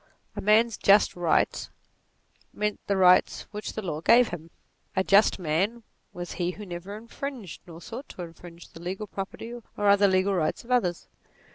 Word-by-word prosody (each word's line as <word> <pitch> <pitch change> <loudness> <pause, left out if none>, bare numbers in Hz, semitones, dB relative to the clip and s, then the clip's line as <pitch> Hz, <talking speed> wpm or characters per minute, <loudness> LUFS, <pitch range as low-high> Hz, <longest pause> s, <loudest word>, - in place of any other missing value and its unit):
A - - -4
man's 220 +2 +3
just 200 +1 +5
rights, 175 -2 +1 0.8
meant 210 0 -2
the 200 - +1
rights 185 -1 +4
which 210 0 -6
the 215 - -5
law 155 -4 -4
gave 235 +7 +5
him: 165 -1 -8 0.5
a 190 - +2
just 200 +2 +4
man, 190 +8 -1 0.3
was 175 0 -7
he 175 -1 -2
who 210 +3 -7
never 185 +3 -7
infringed, 235 - -7
nor 165 0 -11
sought 250 - -8
to 180 - -7
infringe, 170 0 -12
the 165 - -13
legal 190 +4 -4
property 200 +4 -7
or 240 - -8 0.3
other 200 0 +6
legal 190 +1 +2
rights 165 -5 -1
of 240 - -10
others. 180 -9 +1
195 Hz, 170 wpm, -27 LUFS, 175-215 Hz, 0.8 s, other